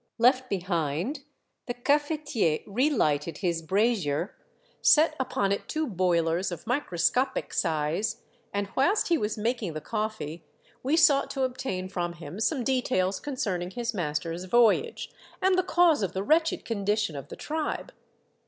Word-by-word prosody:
Left 255 +2 +3
behind, 180 - -2 0.4
the 245 - -3
cafetier 290 - 0
rehghted 195 - +1
his 170 -3 -1
brazier, 185 -3 0 0.5
set 310 0 +5
upon 205 -6 0
it 200 - -2
two 315 0 -1
boilers 175 - +1
of 170 -2 -7
microscopic 250 - 0
size, 160 +4 -1 0.3
and 200 0 -1
whilst 355 +11 +2
he 340 - +4
was 210 +1 -2
making 225 -5 -1
the 155 - -4
coffee, 210 -5 -4 0.4
we 285 +5 +1
sought 295 -4 +5
to 270 - -2
obtain 250 -8 -2
from 175 -2 -3
him 170 +3 -9
some 255 +3 0
details 230 -7 +1
concerning 195 -11 -2
his 235 +4 -3
master's 165 0 -3
voyage, 240 - +2 0.3
and 380 0 +3
the 370 - +4
cause 350 -6 +3
of 190 -2 -1
the 190 - -2
wretched 320 +7 +2
condition 205 -5 0
of 140 - -7
the - - -8
tribe. 310 0 -3
210 Hz, 145 wpm, -27 LUFS, 175-270 Hz, 0.5 s, set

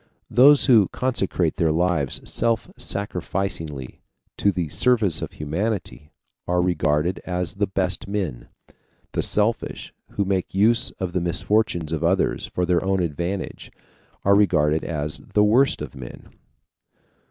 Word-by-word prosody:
Those 140 +5 +6
who 115 -8 +5
consecrate 95 -10 -1
their 85 -4 +2
lives 85 -4 0
self 115 -2 0
sacrificingly 90 -8 -4 0.4
to 100 - +2
the 90 -3 -2
service 110 -1 +2
of - - -5
humanity 85 0 -4 0.4
are 90 0 +1
regarded 85 -1 +1
as 90 -2 -3
the 100 0 -1
best 95 -1 -2
men. 95 -11 -3 0.6
The - - -1
selfish, 105 +2 0 0.2
who 100 - 0
make 95 -1 -2
use 110 +4 +3
of 90 -2 -4
the 90 - 0
misfortunes 85 -1 0
of 80 -3 -2
others - - +1
for 90 - -2
their 90 0 +1
own 95 0 +1
advantage, 85 +4 -4 0.5
are 100 - +5
regarded 80 -6 +3
as 75 -1 -3
the 105 - +1
worst 115 - +3
of 70 - -8
men. 60 -2 -10
90 Hz, 135 wpm, -23 LUFS, 80-100 Hz, 0.6 s, Those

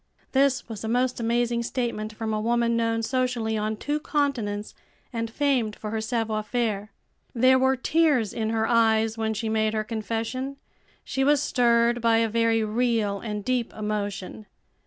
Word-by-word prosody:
This 270 -1 +2
was 225 -3 -7
a - - -3
most 245 +2 +1
amazing 235 +1 +1
statement 235 -3 -3
from 220 0 -3
a 215 - -1
woman 235 +1 +1
known 230 0 0
socially 250 -2 0
on 215 0 -1
two 295 +7 -2
continents, 245 -10 -1 0.4
and 230 -1 -2
famed 245 -4 0
for 215 - -6
her 220 0 -2
savoir 220 -1 -1
faire. 215 -3 -2 0.4
There 255 +2 +5
were 265 +1 +3
tears 270 - +2
in 220 -1 -2
her 220 0 +1
eyes 225 -1 +3
when 220 -1 -1
she 220 +2 -3
made 220 0 +1
her 215 - 0
confession. 230 +5 -3 0.5
She 270 - -1
was 290 +1 +4
stirred 235 -1 +2
by 230 -1 +4
a 225 0 +2
very 230 0 +2
real 215 -2 0
and 210 -2 -5
deep 250 -2 0
emotion. 210 -1 -4
230 Hz, 165 wpm, -25 LUFS, 220-245 Hz, 0.5 s, There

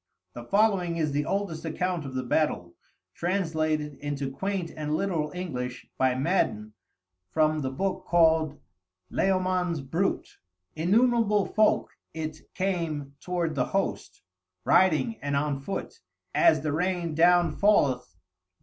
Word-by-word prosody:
The 120 - -8
following 195 - +2
is 155 -3 0
the 145 +1 -1
oldest 195 -5 -2
account 170 -1 -2
of 130 - -8
the 130 - -1
battle, 120 - 0 0.4
translated 160 -5 -1
into 145 -2 -3
quaint 190 +3 -3
and 150 0 -2
literal 165 -5 -1
English 125 -9 -4
by 130 -1 +2
Madden 120 - 0 0.6
from 155 +6 +2
the 130 - -1
book 190 +9 -2
called 160 -3 +3 0.5
"Layamon's 185 -3 +1
Brut"; 165 +9 -1 0.5
"Innumerable 210 +4 +3
folk 215 +2 +2 0.2
it 155 -1 -6
came 165 -7 -2
toward 175 -2 -2
the 130 -4 0
host, - - -3 0.4
riding 190 +5 +3
and 140 0 -1
on 140 -1 0
foot, 195 - -5 0.3
as 335 -2 +4
the 150 -2 -1
rain 175 0 -1
down 175 +1 +4
falleth! 145 -12 +2
160 Hz, 125 wpm, -27 LUFS, 145-185 Hz, 0.6 s, as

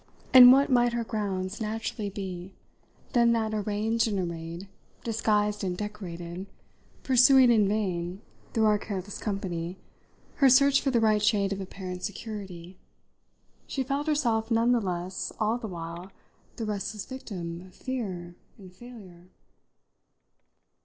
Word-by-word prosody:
And 250 -1 +11
what 275 +1 +4
might 240 -1 +3
her 235 0 -1
grounds 200 -2 -3
more 215 - -1
naturally 220 -1 -4
be 190 -2 -7 0.6
than 235 -1 +4
that, 220 -1 -1
arranged 215 +2 0
and 205 -2 -1
arrayed, 170 0 -5 0.4
disguised 210 -2 0
and 180 -2 -2
decorated, 185 -3 -6 0.6
pursuing 260 0 +6
in 215 -4 +4
vain, 185 -3 -2 0.3
through 220 -1 +2
our 210 -1 +3
careless 200 -1 -5
company, 185 -4 -4 0.6
her 275 -2 +6
search 275 +2 +5
for 275 - 0
the 245 -3 +2
right 215 -1 +3
shade 205 -2 +2
of 195 - -5
apparent 185 -1 -7
security, 190 -4 -7 0.9
she 270 - -2
felt 280 +3 -2
herself 240 -8 +1
none 230 +1 +3
the 240 -2 +3
less 180 -1 -3
all 220 +3 +1
the 230 - -5
while 170 0 -7 0.4
the 225 - -4
restless 210 0 -4
victim 175 -10 -7
of 185 0 -15
fear 190 -10 -5 0.2
and 185 -4 -14
failure? 185 -6 -13
210 Hz, 140 wpm, -27 LUFS, 185-230 Hz, 0.9 s, And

